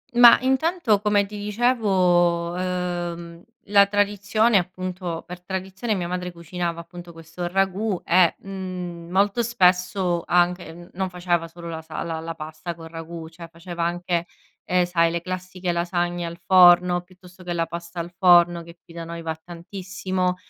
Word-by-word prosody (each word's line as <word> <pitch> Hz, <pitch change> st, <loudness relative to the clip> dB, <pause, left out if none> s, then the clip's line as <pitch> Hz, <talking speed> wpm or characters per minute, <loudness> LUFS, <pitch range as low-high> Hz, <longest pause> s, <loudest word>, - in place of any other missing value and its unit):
Ma 240 Hz, -1 st, +9 dB
intanto 265 Hz, -, +2 dB
come 205 Hz, -1 st, +2 dB
ti 210 Hz, +1 st, -9 dB
dicevo, 185 Hz, -6 st, +2 dB
ehm, 175 Hz, -2 st, -4 dB, 0.2 s
la 200 Hz, -1 st, +6 dB
tradizione, 205 Hz, +2 st, +2 dB
appunto, 180 Hz, -1 st, -5 dB
per 180 Hz, 0 st, -9 dB
tradizione 190 Hz, +4 st, -3 dB
mia 175 Hz, -2 st, -2 dB
madre 180 Hz, 0 st, -3 dB
cucinava 170 Hz, 0 st, -4 dB
appunto 175 Hz, 0 st, -11 dB
questo 165 Hz, +2 st, -6 dB
ragù 195 Hz, +2 st, 0 dB
e, 175 Hz, 0 st, +4 dB
mhmm, 180 Hz, -3 st, -7 dB
molto 200 Hz, +5 st, +2 dB
spesso 180 Hz, -5 st, +2 dB
anche 175 Hz, -1 st, +2 dB
n 175 Hz, +1 st, -13 dB
non 190 Hz, +1 st, -2 dB
faceva 175 Hz, -2 st, -1 dB
solo 170 Hz, 0 st, -11 dB
la 160 Hz, -1 st, -5 dB
sal 160 Hz, +1 st, -6 dB
la 165 Hz, -1 st, -3 dB
la 165 Hz, 0 st, -6 dB
pasta 155 Hz, +2 st, -7 dB
col 165 Hz, 0 st, -11 dB
ragù, 165 Hz, 0 st, -8 dB
cioè 165 Hz, 0 st, -11 dB
faceva 170 Hz, 0 st, -5 dB
anche, 175 Hz, 0 st, -1 dB, 0.4 s
ehm, 180 Hz, -1 st, +2 dB
sai 170 Hz, -1 st, +2 dB
le 170 Hz, 0 st, -2 dB
classiche 185 Hz, 0 st, -4 dB
lasagne 175 Hz, 0 st, -1 dB
al 170 Hz, +1 st, -7 dB
forno, 175 Hz, 0 st, +6 dB
piuttosto 180 Hz, 0 st, -17 dB
che 175 Hz, -1 st, -3 dB
la 165 Hz, -1 st, 0 dB
pasta 170 Hz, +1 st, -7 dB
al 170 Hz, +1 st, -5 dB
forno 175 Hz, -2 st, +5 dB
che 170 Hz, +1 st, -14 dB
qui 165 Hz, -, -16 dB
da 165 Hz, -1 st, -6 dB
noi 170 Hz, 0 st, -7 dB
va 160 Hz, -1 st, -3 dB
tantissimo, 185 Hz, +1 st, -3 dB
180 Hz, 160 wpm, -23 LUFS, 170-190 Hz, 0.4 s, Ma